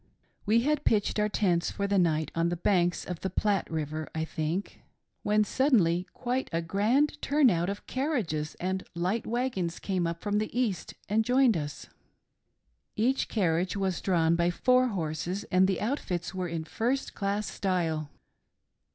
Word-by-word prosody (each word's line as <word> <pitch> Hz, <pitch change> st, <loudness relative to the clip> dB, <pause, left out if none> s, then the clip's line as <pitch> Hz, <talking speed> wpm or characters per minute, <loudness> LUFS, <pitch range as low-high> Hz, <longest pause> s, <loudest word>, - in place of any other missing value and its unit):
We 225 Hz, +2 st, +4 dB
had 295 Hz, +3 st, +1 dB
pitched 210 Hz, -1 st, +2 dB
our 210 Hz, 0 st, +2 dB
tents 180 Hz, -5 st, +1 dB
for 200 Hz, -, -2 dB
the 200 Hz, -1 st, +2 dB
night 160 Hz, -3 st, +1 dB
on 165 Hz, +1 st, +1 dB
the 175 Hz, -, -1 dB
banks 175 Hz, 0 st, +1 dB
of 180 Hz, -2 st, -5 dB
the 190 Hz, -, -2 dB
Platte 200 Hz, +1 st, 0 dB
River, 155 Hz, -1 st, -3 dB
I 160 Hz, 0 st, -1 dB
think, 160 Hz, +5 st, -3 dB, 0.4 s
when 210 Hz, +1 st, +3 dB
suddenly 195 Hz, -, +2 dB
quite 255 Hz, +2 st, -2 dB
a 165 Hz, -, 0 dB
grand' 220 Hz, -, +1 dB
turn 285 Hz, -4 st, +4 dB
out 175 Hz, +1 st, 0 dB
of 200 Hz, +1 st, -5 dB
carriages 220 Hz, -, -2 dB
and 190 Hz, +1 st, -2 dB
light 185 Hz, +6 st, -1 dB
wagons 225 Hz, -8 st, -1 dB
came 185 Hz, -4 st, -1 dB
up 170 Hz, 0 st, -4 dB
from 205 Hz, 0 st, +1 dB
the 215 Hz, +3 st, -2 dB
east 210 Hz, -9 st, -1 dB
and 215 Hz, +3 st, +2 dB
joined 250 Hz, -1 st, +4 dB
us> 145 Hz, -3 st, -4 dB, 1.1 s
Each 250 Hz, +5 st, +1 dB
carriage 180 Hz, -2 st, 0 dB
was 190 Hz, -2 st, -1 dB
drawn 170 Hz, -3 st, +2 dB
by 170 Hz, 0 st, +2 dB
four 255 Hz, +7 st, +3 dB
horses, 180 Hz, 0 st, -3 dB
and 185 Hz, 0 st, +5 dB
the 190 Hz, -2 st, 0 dB
outfits 210 Hz, -, -2 dB
■ -, -, -18 dB
were 185 Hz, -1 st, -2 dB
in 165 Hz, -1 st, -3 dB
first 245 Hz, +10 st, -2 dB
class 200 Hz, +1 st, -1 dB
style. 165 Hz, -6 st, -1 dB
190 Hz, 170 wpm, -29 LUFS, 170-220 Hz, 1.1 s, and